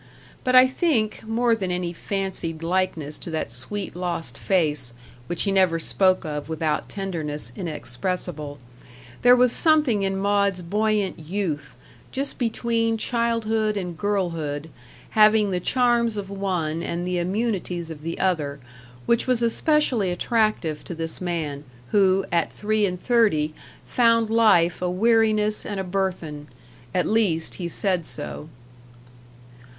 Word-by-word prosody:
But 255 Hz, 0 st, +2 dB
I 255 Hz, 0 st, +9 dB
think, 260 Hz, -, 0 dB
more 230 Hz, +1 st, +2 dB
than 195 Hz, -5 st, -1 dB
any 180 Hz, -1 st, -2 dB
fancied 175 Hz, -4 st, -4 dB
likeness 165 Hz, -4 st, -1 dB
to -, -, -5 dB
that 160 Hz, -8 st, -3 dB
sweet 180 Hz, -, -2 dB
lost 175 Hz, -2 st, -3 dB
face, 150 Hz, -10 st, 0 dB, 0.3 s
which 175 Hz, -, -1 dB
he 200 Hz, -, 0 dB
never 185 Hz, -4 st, +3 dB
spoke 185 Hz, +2 st, +2 dB
of 150 Hz, 0 st, -5 dB
without 155 Hz, -1 st, -1 dB
tenderness 155 Hz, -, -4 dB
inexpressible, 155 Hz, -1 st, -3 dB, 0.6 s
there 245 Hz, 0 st, +7 dB
was 250 Hz, -1 st, +4 dB
something 300 Hz, -10 st, +3 dB
in 195 Hz, 0 st, -1 dB
Maud's 200 Hz, -2 st, +1 dB
buoyant 210 Hz, 0 st, 0 dB
youth 155 Hz, -6 st, -3 dB, 0.4 s
just 275 Hz, +2 st, -3 dB
between 230 Hz, -1 st, 0 dB
childhood 225 Hz, -2 st, 0 dB
and 180 Hz, -3 st, -4 dB
girlhood, 160 Hz, -6 st, -2 dB, 0.4 s
having 215 Hz, -1 st, +5 dB
the 180 Hz, -, 0 dB
charms 235 Hz, +1 st, +2 dB
of 200 Hz, -1 st, -5 dB
one 180 Hz, -5 st, -2 dB
and 170 Hz, +1 st, -3 dB
the 180 Hz, -1 st, -1 dB
immunities 180 Hz, -3 st, -2 dB
of 150 Hz, -2 st, -9 dB
the 165 Hz, +2 st, -4 dB
other 150 Hz, -7 st, 0 dB, 0.5 s
which 235 Hz, +2 st, +2 dB
was 250 Hz, -2 st, +1 dB
especially 245 Hz, -, +2 dB
attractive 185 Hz, -5 st, 0 dB
to 175 Hz, -, -6 dB
this 165 Hz, +1 st, -3 dB
man, 160 Hz, -5 st, -3 dB, 0.3 s
who, 195 Hz, -1 st, +3 dB
at 170 Hz, -1 st, +1 dB
three 215 Hz, 0 st, 0 dB
and 180 Hz, -1 st, -4 dB
thirty, 195 Hz, -11 st, +2 dB, 0.3 s
found 230 Hz, -2 st, +3 dB
life 180 Hz, -8 st, +4 dB
a 180 Hz, -, 0 dB
weariness 215 Hz, +1 st, +2 dB
and 205 Hz, -2 st, -4 dB
a -, -, -1 dB
burthen 180 Hz, -6 st, -3 dB, 0.4 s
at 180 Hz, -, +1 dB
least, 195 Hz, -8 st, +1 dB
he 175 Hz, -, -2 dB
said 180 Hz, 0 st, -1 dB
so. 150 Hz, -, -3 dB
190 Hz, 135 wpm, -24 LUFS, 165-220 Hz, 0.6 s, I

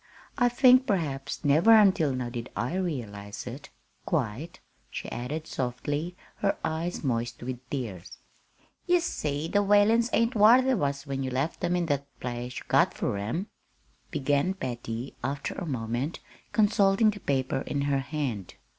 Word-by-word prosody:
"I 245 Hz, -3 st, +3 dB
think 255 Hz, +1 st, +5 dB
perhaps 145 Hz, -8 st, -2 dB
never 160 Hz, +11 st, +6 dB
until 190 Hz, -9 st, +5 dB
now 125 Hz, -2 st, -3 dB
did 120 Hz, -1 st, -5 dB
I 120 Hz, +7 st, -1 dB
realize 105 Hz, -, -4 dB
it 125 Hz, +4 st, -8 dB, 0.3 s
quite," 145 Hz, +2 st, -2 dB, 0.3 s
she -, -, -6 dB
added 145 Hz, +6 st, -4 dB
softly, 145 Hz, +6 st, -3 dB, 0.2 s
her 200 Hz, -, 0 dB
eyes 160 Hz, +2 st, -3 dB
moist 120 Hz, -2 st, -2 dB
with 125 Hz, 0 st, -4 dB
tears. 110 Hz, -10 st, -5 dB, 0.7 s
"Ye 355 Hz, 0 st, +5 dB
see 150 Hz, -, -2 dB
the 205 Hz, +4 st, +2 dB
Whalens 205 Hz, +4 st, +4 dB
ain't 230 Hz, +2 st, +2 dB
whar 230 Hz, +4 st, +7 dB
they 265 Hz, 0 st, +2 dB
was 140 Hz, -, -1 dB
when 135 Hz, -1 st, -3 dB
you 130 Hz, -, -2 dB
left 135 Hz, +5 st, -2 dB
'em 175 Hz, -, +1 dB
in 175 Hz, -1 st, +1 dB
that 140 Hz, -3 st, -1 dB
nice -, -, -35 dB
place 125 Hz, 0 st, -5 dB
you -, -, -7 dB
got -, -, +3 dB
fur -, -, -1 dB
'em," 115 Hz, -, -2 dB, 0.6 s
began 145 Hz, +7 st, +1 dB
Patty, 120 Hz, -5 st, -5 dB
after 140 Hz, +2 st, -2 dB
a 180 Hz, -, -5 dB
moment, 125 Hz, +3 st, -2 dB, 0.3 s
consulting 210 Hz, 0 st, +4 dB
the 205 Hz, -, -9 dB
paper 135 Hz, -4 st, -1 dB
in 140 Hz, -, -1 dB
her 140 Hz, -1 st, +1 dB
hand. 135 Hz, -, -4 dB
145 Hz, 160 wpm, -28 LUFS, 125-190 Hz, 0.7 s, whar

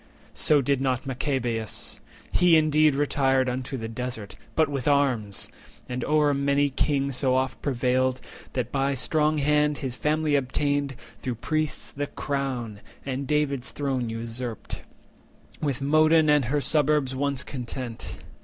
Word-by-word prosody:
So 150 Hz, -2 st, +3 dB
did 135 Hz, 0 st, +1 dB
not 130 Hz, -2 st, 0 dB
Machabeus. 125 Hz, -4 st, -2 dB, 0.3 s
He 175 Hz, -2 st, +5 dB
indeed 155 Hz, -1 st, +4 dB
Retired 135 Hz, -2 st, +2 dB
unto 130 Hz, +1 st, -3 dB
the 115 Hz, -2 st, -4 dB
Desert, 115 Hz, -3 st, -5 dB, 0.2 s
but 160 Hz, -1 st, +4 dB
with 140 Hz, -2 st, -3 dB
arms; 130 Hz, -9 st, +1 dB, 0.4 s
And 125 Hz, 0 st, -3 dB
o'er 150 Hz, -1 st, +3 dB
a -, -, +1 dB
mighty 140 Hz, +1 st, +2 dB
king 140 Hz, 0 st, 0 dB
so 130 Hz, 0 st, +1 dB
oft 130 Hz, 0 st, -1 dB
prevailed 130 Hz, -1 st, +1 dB, 0.3 s
That 125 Hz, -2 st, -2 dB
by 135 Hz, 0 st, +1 dB
strong 155 Hz, +3 st, +1 dB
hand 150 Hz, 0 st, +2 dB
his 130 Hz, -4 st, -3 dB
family 155 Hz, +2 st, 0 dB
obtained, 140 Hz, +1 st, 0 dB, 0.3 s
Though 125 Hz, -3 st, -2 dB
priests, 155 Hz, +5 st, -1 dB
the 145 Hz, +1 st, -3 dB
crown, 130 Hz, -9 st, -3 dB, 0.3 s
and 135 Hz, 0 st, -3 dB
David's 145 Hz, -3 st, 0 dB
throne 130 Hz, -5 st, -2 dB
usurped, 115 Hz, +1 st, -5 dB, 0.8 s
With 140 Hz, -3 st, -1 dB
Modin 155 Hz, +1 st, +5 dB
and 145 Hz, -3 st, +4 dB
her 145 Hz, +5 st, 0 dB
suburbs 145 Hz, -1 st, +2 dB
once 140 Hz, 0 st, 0 dB
content. 125 Hz, -2 st, -6 dB
135 Hz, 140 wpm, -26 LUFS, 125-145 Hz, 0.8 s, He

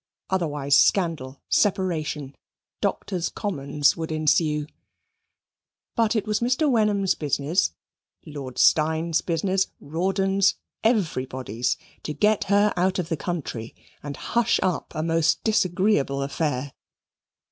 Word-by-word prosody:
Otherwise, 150 Hz, -6 st, +1 dB
scandal, 145 Hz, -4 st, +2 dB
separation, 165 Hz, -8 st, 0 dB, 0.5 s
Doctors' 180 Hz, -4 st, -1 dB
Commons 145 Hz, -7 st, 0 dB
would 160 Hz, -1 st, -5 dB
ensue. 155 Hz, -1 st, +1 dB, 1.3 s
But 230 Hz, -1 st, +2 dB
it 215 Hz, -, 0 dB
was 210 Hz, -1 st, 0 dB
Mr. 255 Hz, +6 st, +1 dB
Wenham's 210 Hz, -6 st, +2 dB
business, 145 Hz, -, 0 dB, 0.5 s
Lord 140 Hz, -4 st, -8 dB
Steyne's 160 Hz, +1 st, +3 dB
business, 185 Hz, +3 st, 0 dB
Rawdon's, 190 Hz, +4 st, +1 dB, 0.3 s
everybody's 130 Hz, -, 0 dB, 0.2 s
to 150 Hz, -, -4 dB
get 215 Hz, 0 st, +2 dB
her 205 Hz, +1 st, +3 dB
out 185 Hz, +1 st, +1 dB
of 180 Hz, -3 st, -3 dB
the 165 Hz, -, 0 dB
country, 145 Hz, -9 st, -5 dB, 0.3 s
and 145 Hz, -1 st, -6 dB
hush 235 Hz, 0 st, +1 dB
up 185 Hz, -2 st, -1 dB
a 155 Hz, -, -1 dB
most 165 Hz, 0 st, +1 dB
disagreeable 185 Hz, -9 st, +1 dB
affair. 140 Hz, -1 st, -2 dB
165 Hz, 110 wpm, -24 LUFS, 145-195 Hz, 1.3 s, Steyne's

